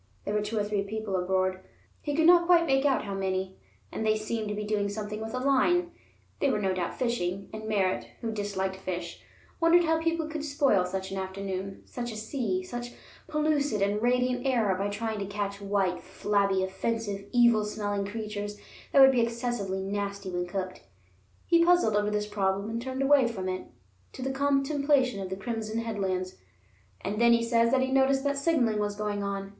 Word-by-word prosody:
There 205 - -2
were 210 - +1
two 210 +2 -3
or 210 - +2
three 205 -1 -1
people 210 0 -3
aboard, 185 0 0 0.4
he 290 -1 -2
could 320 +1 +3
not 345 0 +6
quite 345 -1 +6
make 270 -2 +2
out 275 -2 +2
how 200 - -4
many, 190 -1 -2 0.3
and - - -3
they 215 0 +2
seemed 215 0 -3
to 210 - -3
be 210 - -3
doing 205 -1 0
something 210 +1 -5
with 225 +3 -5
a - - -1
line; 280 +7 +2 0.5
they 280 - +2
were 235 - +1
no 195 -2 0
doubt 180 -2 -3
fishing, 195 -6 -2
and 215 0 -6
Merritt 195 -3 0
(who 230 - -2
disliked 195 -3 -2
fish) 175 -2 -5 0.4
wondered 340 +1 +5
how 320 -1 +1
people 330 -1 0
could 310 -1 -5
spoil 280 -10 +2
such 190 +1 -4
an 195 - -3
afternoon, 190 0 -5
such 240 -1 -5
a - - -7
sea, 215 -4 -2
such 240 +5 -6 0.3
pellucid 295 -8 +1
and 205 +1 0
radiant 250 +1 +1
air 230 -7 +2
by 195 +2 -1
trying 215 +1 -3
to 195 - -3
catch 200 0 -4
white, 195 -2 0
flabby, 195 0 0
offensive, 200 +1 -3
evil 235 -3 +5
smelling 205 -1 -2
creatures 210 -1 -5 0.4
that 275 - +7
would 265 - +8
be 250 -2 +2
excessively 230 -5 -2
nasty 200 -1 -3
when 175 0 -2
cooked. 185 0 -4 0.6
He 335 0 +4
puzzled 350 -11 +4
over 210 0 +2
this 210 0 -1
problem 200 0 -1
and 230 +1 -3
turned 260 +2 -3
away 275 -2 +5
from 195 -5 -4
it 185 0 -3 0.5
to 260 - -6
the 265 - -1
contemplation 275 -3 +2
of 190 - -5
the 190 - -3
crimson 220 +1 -4
headlands. 190 -5 -2 0.6
And 210 +3 -2
then 235 0 +6
he 235 0 +3
says 230 0 +3
that 260 +1 +3
he 260 0 0
noticed 270 0 +3
that 280 -1 0
signaling 260 -9 +2
was 205 -1 -1
going 210 -1 -2
on. 200 0 -3
215 Hz, 195 wpm, -28 LUFS, 195-255 Hz, 0.6 s, would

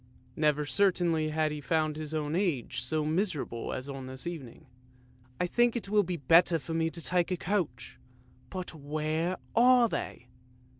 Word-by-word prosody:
Never 150 -1 +2
certainly 170 -3 +2
had 155 0 0
he 150 -1 -5
found 155 +2 0
his 155 -1 -5
own 155 0 -2
Age 175 - -1
so 155 -1 -1
miserable 155 - -1
as 130 +1 -4
on 135 -2 -6
this 130 +3 -8
evening. 150 -9 -7 0.4
" 125 0 -29
I 180 - +2
think 240 +6 +2
it 225 -4 -3
will 210 0 +4
be 180 -2 -3
better 165 +4 +5
for 160 +2 -6
me 165 0 +1
to 170 - -9
take 175 +1 +1
a 180 - -1
coach; 170 - -2 0.5
but 185 -2 -5
where 155 +4 -2 0.2
are 245 0 +6
they? 125 - -5
160 Hz, 170 wpm, -30 LUFS, 145-180 Hz, 0.5 s, are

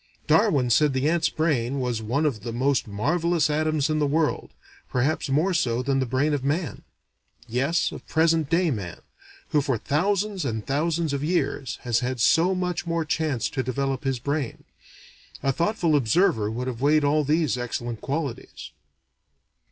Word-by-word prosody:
Darwin 130 -3 +3
said 150 +2 +4
the 130 +2 0
ant's 165 0 +2
brain 140 -5 0
was 125 -3 -2
"one 130 +8 0
of 125 -9 -1
the 115 +2 -5
most 130 +2 0
marvelous 160 +9 +1
atoms 155 -1 +1
in 155 -1 0
the 145 - +2
world, 155 +2 0 0.4
perhaps 135 +4 0
more 155 +8 +2
so 125 -6 0
than 135 0 +1
the 130 - 0
brain 135 +5 +1
of 140 -3 -1
man" 145 +1 -2 0.7
yes, 140 +8 0
of - - -10
present 160 -2 +2
day 170 0 +2
man, 100 -8 -5 0.5
who 150 - +2
for 135 -3 0
thousands 195 - 0
and 110 -5 -3
thousands 160 +2 0
of 140 0 -2
years 145 -5 -1
has 120 -2 +1
had 125 0 -3
so 170 +10 +4
much 180 0 -2
more 165 -1 -1
chance 150 -5 -1
to 130 - -2
develop 135 +1 -2
his 135 -2 0
brain.... 140 +1 -3 0.8
A 135 - +2
thoughtful 170 - +1
observer 120 - +2
would 120 +3 -4
have 125 -2 -5
weighed 150 +2 +3
all 150 +1 +2
these 150 -4 +1
excellent 120 -2 -4
qualities. 140 -3 -5
145 Hz, 165 wpm, -25 LUFS, 125-160 Hz, 0.8 s, said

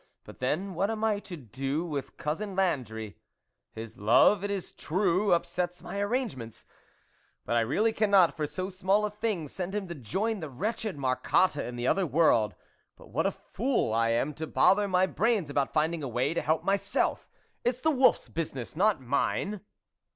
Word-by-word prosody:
But - - -13
then, 185 +10 -1
what 190 +4 0
am 220 -1 -3
I 215 -2 +2
to 190 -4 -9
do 135 - -3
with 145 -5 -5
Cousin 190 +6 -3
Landry? 115 - -1 0.5
his 110 0 -9
love, 125 - +5
it 205 - -2
is 200 -3 -4
true, 190 +3 +1
up 170 - +3
sets 180 0 -3
my 200 - -5
arrangements; 205 - -3 0.8
but 120 - -1
I - - +4
really 200 - +1
cannot 200 -5 +4
for 155 -2 -2
so 185 +4 -4
small 190 +3 +2
a 210 - -3
thing 210 -6 -2
send 185 +6 -4
him 205 -2 -2
to - - -3
join 195 - -2
the 155 -4 -6
wretched 210 - -3
Marcotte 135 +6 +2
in 125 -3 -4
the 120 0 -3
other 190 +6 +2
world. 140 - +3 0.4
But - - -16
what - - +1
a - - 0
fool 240 - -1
I 115 0 +2
am 120 +6 0
to 160 +2 -5
bother 205 +5 +4
my 185 -1 +3
brains 205 -6 0
about 140 -1 0
finding 160 +2 0
a 140 - -3
way 125 +5 0
to - - -1
help 160 +1 0
my 195 +1 +3
self! 200 0 -1 0.3
It's 245 +1 0
the 315 - +3
wolfs 260 -3 +3
business, 140 -7 -5
not 200 -3 +2
mine 160 - -1
175 Hz, 190 wpm, -29 LUFS, 135-205 Hz, 0.8 s, love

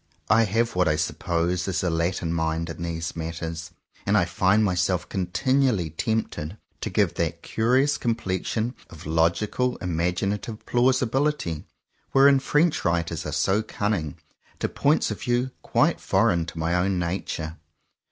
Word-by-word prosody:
I 115 0 +6
have 115 +3 0
what 90 -1 +3
I 75 - +3
suppose 85 +3 -1
is 95 0 -1
a 90 - +1
Latin 85 0 -1
mind 80 0 -1
in 80 - -9
these 85 0 -3
matters; 80 0 -5 0.3
and 100 +2 +2
I 90 - +3
find 95 +4 +2
myself 90 -2 +1
continually 105 - +1
tempted, 105 -3 -2 0.2
to - - -2
give - - +2
that - - -2
curious 130 +6 +2
complexion 115 +1 -1 0.2
of 80 - -12
logical 85 +10 +1
imaginative 90 +5 -2
plausi 130 +1 +3
bility, 135 - -1 0.5
wherein 140 0 +6
French 150 +4 +2
writers 85 -2 -1
are - - -3
so 95 +7 +2
cunning, 105 -8 -2 0.4
to - - -1
points 145 +3 +1
of - - -5
view 125 +1 0
quite - - +2
foreign 85 -2 +2
to 85 - -8
my 80 +1 0
own 90 +1 +1
nature. 85 -2 -3
90 Hz, 145 wpm, -25 LUFS, 85-115 Hz, 0.5 s, I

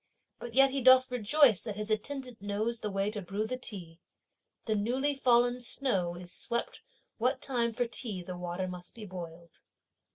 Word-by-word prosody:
But 240 -1 -8
yet 270 0 +7
he 275 0 -1
doth 255 0 +7
rejoice 250 - +4
that 215 -3 -5
his 210 +1 -4
attendant 250 +1 -3
knows 215 +3 -2
the 210 - -3
way 195 +1 -1
to 210 -1 -4
brew 195 +4 -3
the 255 - -3
tea. 185 -9 -8 0.7
The 220 - +1
newly 250 +7 0
fallen 245 -2 +3
snow 200 -8 0
is 175 0 -8
swept 235 0 -3 0.4
what 250 +3 +1
time 240 -3 0
for 245 +2 0
tea 225 -6 -4
the 180 +1 -6
water 180 +1 -3
must 180 -1 -8
be 220 -2 -8
boiled. 170 -3 -9
220 Hz, 175 wpm, -31 LUFS, 190-250 Hz, 0.7 s, yet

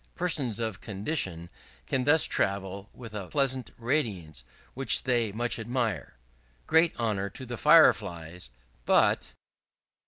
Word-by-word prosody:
Persons 145 - -1
of 110 -4 -4
condition 95 - -3 0.4
can 130 -2 -1
thus 155 +2 +5
travel 100 +1 -1
with 115 -3 -11
a 100 -3 -5
pleasant 130 -2 -1
radiance, 105 - -2 0.3
which 135 +1 +3
they 120 -4 0
much 120 +3 -2
admire. 115 - -3 0.5
Great 165 -3 +2
honour 105 -4 -1
to 130 - -9
the 120 0 -6
Fire 150 +6 +7
flies! 85 - -9 0.3
But - - +2
115 Hz, 125 wpm, -28 LUFS, 100-130 Hz, 0.5 s, Fire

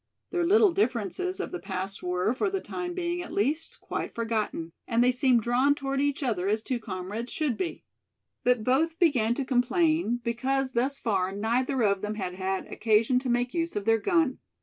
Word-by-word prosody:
Their 350 -2 +1
little 410 +1 +6
differences 255 - -1
of 390 - -3
the 360 - -4
past 190 - -4
were, 180 +4 0
for 375 +10 0
the 390 0 -1
time 355 -1 -5
being 350 -1 -2
at 350 - -8
least, 295 +10 -1
quite - - -5
forgotten; 220 -7 -2 0.2
and 235 0 +3
they 250 - +5
seemed 250 -2 +3
drawn 255 +5 +3
toward 275 -1 -2
each 285 0 0
other 205 -8 0
as 215 +2 0
two 255 -1 -2
comrades 205 +2 -5
should 300 -7 0
be. 365 -3 -4 0.6
But 245 -3 +3
both 315 +7 +2
began 250 -10 +3
to 275 - -2
complain 270 +1 +2
because 260 +3 0
thus 265 +3 0
far 190 -6 0
neither 240 +5 0
of 200 -2 +2
them 210 0 -3
had 185 -4 -3
had 190 +1 -2
occasion 225 +3 +2
to 255 0 -4
make 245 +1 +1
use 335 -4 -1
of 205 -1 -2
their 225 0 +4
gun. 325 - +1
245 Hz, 195 wpm, -27 LUFS, 215-300 Hz, 0.6 s, little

